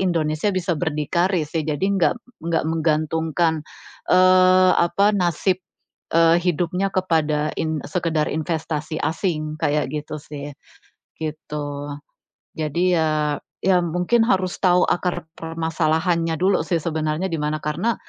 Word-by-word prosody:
Indonesia 165 0 0
bisa 185 -2 -1
berdikari 170 +3 0
sih, 160 -1 -2
jadi 150 -2 -2
nggak 195 -3 +2 0.3
nggak 165 -2 0
menggantungkan, 160 0 0 0.5
eee, 185 0 +6
apa, 175 +4 +3
nasib, 180 0 +1 0.6
eee, 165 0 +5
hidupnya 180 +2 0
kepada 155 -5 +1
in 155 -1 -1
sekedar 165 -4 0
investasi 160 -1 -3
asing, 155 -3 -2
kayak 150 -1 +1
gitu 150 0 -4
sih, 145 0 -8 0.7
gitu. 145 -2 -5 0.6
Jadi 170 +4 +1
ya 155 -2 +1 0.3
ya 185 -1 +4
mungkin 180 +7 +1
harus 185 -5 0
tahu 180 -1 +4
akar 175 -1 -1
permasalahannya 165 +1 0
dulu 185 +4 +2
sih, 175 - +1
sebenarnya 155 +2 -1
di 165 - -2
mana. 150 +1 -2
Karena, 170 +10 0
165 Hz, 120 wpm, -22 LUFS, 155-180 Hz, 0.7 s, eee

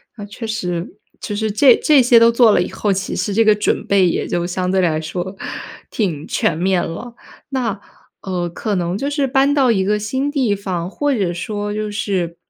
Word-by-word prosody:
那 210 -3 -8
确 205 +3 -8
实。 180 -5 -3 0.3
其 205 - -5
实 220 0 -1
这 240 +7 +6
这 295 -3 +4
些 240 -1 +6
都 230 0 +6
做 235 -1 +5
了 180 - +3
以 - - -2
后， 205 -2 -1
其 190 0 -3
实 205 - -2
这 225 +3 +4
个 215 -1 +5
准 210 - 0
备 195 -2 +4
也 170 - -1
就 175 0 -1
相 180 +1 -2
对 190 +1 +1
来 160 -3 +1
说 180 +4 -5 0.5
挺 170 -9 -2
全 - - 0
面 180 +2 +1
了。 235 +9 -8 0.3
那， 240 -7 -2 0.4
呃， 180 -2 -3
可 205 +4 -3
能 175 -1 -1
就 275 +8 -2
是 285 -1 0
搬 270 +2 +2
到 270 -4 +3
一 190 -3 +1
个 210 +2 +1
新 260 +7 -2
地 260 -8 0
方， 185 -4 -4
或 290 +8 -1
者 190 -6 -1
说 205 +4 -4
就 215 0 -3
是 190 -5 -2
205 Hz, 225 characters per minute, -18 LUFS, 180-230 Hz, 0.5 s, 这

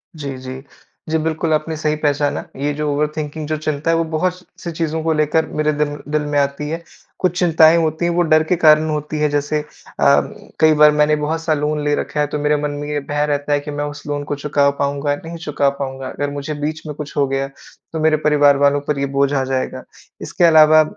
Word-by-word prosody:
जी, 140 -4 -6
जी। 130 +1 -8 0.5
जी, 160 - +1
बिल्कुल, 160 0 -1
आपने 155 +1 -1
सही 155 0 0
पहचाना। 145 -1 0 0.2
ये 145 0 0
जो 150 0 -2
ओवर 150 +1 +1
थिंकिंग 150 0 -4
जो 155 - -1
चलता 155 +1 -1
है, 165 - +2
वो 165 - +1
बहुत-सी 175 +2 -4
चीज़ों 160 -1 -2
को 160 - +1
लेकर 155 +1 +1
मेरे 155 0 -1
दिल 145 0 -1 0.2
दिल 150 - +1
में 145 -1 -2
आती 140 +1 -1
है। 165 +2 -4 0.4
कुछ 180 -1 0
चिंताएँ 165 -2 +5
होती 160 +2 -1
हैं, 175 - +1
वो 175 - +2
डर 155 -2 +4
के 180 - +3
कारण 155 -2 +5
होती 150 0 -3
हैं, 150 -1 +2
जैसे 145 +1 0
अ, 150 - -7 0.9
कई 155 0 +5
बार 150 0 +6
मैंने 150 0 +3
बहुत-सा 155 +2 -1
लोन 150 0 -1
ले 145 0 +1
रखा 150 - -3
है, 150 - +3
तो 150 +1 -4
मेरे 150 0 +2
मन 150 - -1
में 145 0 -5
ये 150 0 -1
भय 145 +1 -1
रहता 145 0 -1
है 145 - +2
कि 145 +1 -7
मैं 145 0 -3
उस 145 0 -7
लोन 145 0 -2
को 145 0 -3
चुका 145 0 +1
पाउँगा 140 +1 0
या 145 - 0
नहीं 170 +1 -7
चुका 145 -1 +1
पाउँगा? 135 -1 -4
अगर 145 +2 -3
मुझे 145 +2 -4
बीच 155 +2 -3
में 150 - -4
कुछ 150 0 -8
हो 140 - +3
गया, 135 0 -1 0.5
तो 160 - -2
मेरे 155 0 +3
परिवार 145 -2 +5
वालों 145 0 +3
पर 145 -2 -1
ये 140 - 0
बोझ 140 0 +2
आ 135 -2 +1
जाएगा। 130 0 -3 0.4
इसके 175 - -2
अलावा, 155 -1 +7
150 Hz, 235 wpm, -19 LUFS, 145-155 Hz, 0.9 s, अलावा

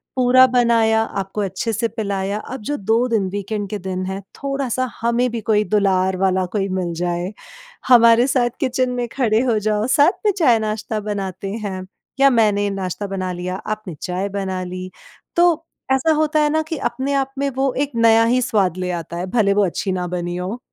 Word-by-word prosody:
पूरा 255 0 +6
बनाया 230 -3 +3
आपको 200 -2 -3
अच्छे 195 +4 -2
से 230 +2 0
पिलाया 200 -3 -3 0.2
अब 260 - -6
जो 290 - -1
2 225 +5 +1
दिन 220 -5 0
वीकेंड 205 +1 -4
के 210 - -3
दिन 185 0 -4
हैं 190 +1 -4
थोड़ा-सा 270 -2 -2
हमें 235 +2 +1
भी 230 -1 -4
कोई 215 -1 +2
दुलार 190 -3 +1
वाला 190 0 +1
कोई 195 -2 +1
मिल 185 -2 -2
जाए, 175 +1 -2 0.6
हमारे 235 0 +6
साथ 250 -3 +2
किचन 255 -2 0
में 245 -1 -2
खड़े 225 -4 +2
हो 235 -4 +2
जाओ 210 +1 0
साथ 290 +6 +3
में 420 - +5
चाय 250 - +4
नाश्ता 215 0 -3
बनाते 195 -2 -4
हैं, 200 -4 -5 0.3
या 275 0 +7
मैंने 210 -4 +2
नाश्ता 195 +1 -4
बना 185 -1 -3
लिया 180 +1 -4
आपने 215 -3 -5
चाय 185 +2 -2
बना 190 -2 -3
ली। 185 +1 -6 0.4
तो, 340 -2 +3 0.3
ऐसा 265 +4 +3
होता 310 0 +1
है 300 - +3
ना 315 +1 +1
कि 320 - -2
अपने 260 +3 -2
आप 270 -1 0
में 280 0 +1
वो 265 -1 +1
एक 290 0 -1
नया 225 -1 +5
ही 250 +2 +2
स्वाद 200 -8 +1
ले 185 0 -3
आता 170 -1 -5
है 175 - -3
भले 205 -4 +3
वो 205 0 +3
अच्छी 190 +2 -2
न 180 -1 -2
बनी 175 -1 -3
हो। 185 +7 -4
215 Hz, 195 wpm, -20 LUFS, 190-250 Hz, 0.6 s, या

